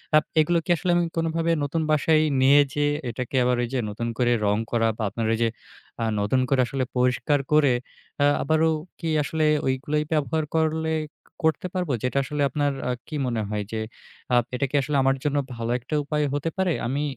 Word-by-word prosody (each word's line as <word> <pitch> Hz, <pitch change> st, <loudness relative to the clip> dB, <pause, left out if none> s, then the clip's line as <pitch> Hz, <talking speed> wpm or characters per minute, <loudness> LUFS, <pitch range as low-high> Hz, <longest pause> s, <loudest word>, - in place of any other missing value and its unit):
আ -, -, +9 dB, 0.2 s
এগুলো 170 Hz, +3 st, +3 dB
কি -, -, -15 dB
আসলে 175 Hz, +3 st, 0 dB
আমি 175 Hz, -, +2 dB
কোনোভাবে 165 Hz, 0 st, 0 dB
নতুন 150 Hz, +3 st, -1 dB
বাসায় 155 Hz, +1 st, +3 dB, 0.2 s
নিয়ে 140 Hz, +2 st, +6 dB
যেয়ে, 145 Hz, 0 st, +1 dB, 0.2 s
এটাকে 125 Hz, +3 st, -5 dB
আবার 125 Hz, 0 st, +2 dB
ওই 120 Hz, -, -1 dB
যে 130 Hz, -, +1 dB
নতুন 115 Hz, +3 st, -4 dB
করে 120 Hz, -1 st, +2 dB
রং 100 Hz, 0 st, +2 dB
করা 115 Hz, -1 st, +2 dB
বা 110 Hz, -, -3 dB
আপনার 115 Hz, +3 st, -3 dB
ঐ -, -, +2 dB
যে 115 Hz, -, +2 dB, 0.5 s
আ -, -, +1 dB, 0.2 s
নতুন 105 Hz, +6 st, +1 dB
করে 135 Hz, -2 st, +3 dB
আসলে 135 Hz, -1 st, -2 dB
পরিষ্কার 125 Hz, +4 st, +2 dB
করে, 150 Hz, -4 st, +5 dB, 0.5 s
আ -, -, +5 dB, 0.2 s
আবারো 160 Hz, +3 st, +2 dB, 0.3 s
কি 165 Hz, -, -3 dB
আসলে 155 Hz, +1 st, 0 dB, 0.2 s
ওইগুলাই 145 Hz, +3 st, 0 dB
ব্যবহার 155 Hz, +1 st, 0 dB
করলে 160 Hz, 0 st, +1 dB, 0.5 s
করতে 160 Hz, +3 st, +1 dB
পারবো, 180 Hz, -6 st, -1 dB
যেটা 125 Hz, +2 st, -1 dB
আসলে 145 Hz, +1 st, -3 dB
আপনার 145 Hz, -1 st, 0 dB, 0.2 s
আ -, -, +1 dB, 0.2 s
কি 155 Hz, -, -6 dB
মনে 115 Hz, -3 st, -1 dB
হয় 105 Hz, -1 st, -2 dB
যে 110 Hz, -, -2 dB, 0.5 s
আ -, -, +6 dB, 0.2 s
এটা 130 Hz, -, 0 dB
কি 145 Hz, -, -4 dB
আসলে 145 Hz, +1 st, -1 dB
আমার 135 Hz, 0 st, +3 dB
জন্য 145 Hz, -1 st, 0 dB, 0.2 s
ভালো 115 Hz, 0 st, -3 dB
একটা 130 Hz, +6 st, -4 dB
উপায় 150 Hz, +1 st, -1 dB
হতে 145 Hz, +3 st, -1 dB
পারে? 185 Hz, -3 st, +1 dB
আমি 140 Hz, +4 st, -1 dB
145 Hz, 200 wpm, -24 LUFS, 125-155 Hz, 0.5 s, আ